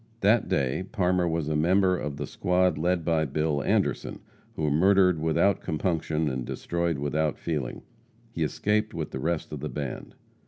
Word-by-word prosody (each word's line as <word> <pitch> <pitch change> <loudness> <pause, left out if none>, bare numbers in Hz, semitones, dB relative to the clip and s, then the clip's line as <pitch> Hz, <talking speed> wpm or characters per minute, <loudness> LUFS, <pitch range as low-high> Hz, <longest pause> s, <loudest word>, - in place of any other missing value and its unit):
That 105 +4 +3
day 70 +6 0
Parmer 90 -2 +1
was 80 -2 -1
a 75 - 0
member 90 +4 +3
of 75 -5 -4
the - - -3
squad 90 0 +1
led 85 +2 0
by 80 -2 +2
Bill 75 +1 0
Anderson, - - 0 0.4
who 75 -2 0
murdered 90 +2 +4
without 80 +5 +2
compunction 80 -1 -1
and 65 -3 -2
destroyed 85 +4 -2
without 75 +2 -1
feeling. 75 -7 -4 0.5
He - - -5
escaped 105 +1 0
with 80 -2 -4
the 65 - -4
rest 80 +3 -2
of 75 - -5
the 75 +2 -4
band. 70 -4 -6
80 Hz, 165 wpm, -27 LUFS, 75-90 Hz, 0.5 s, murdered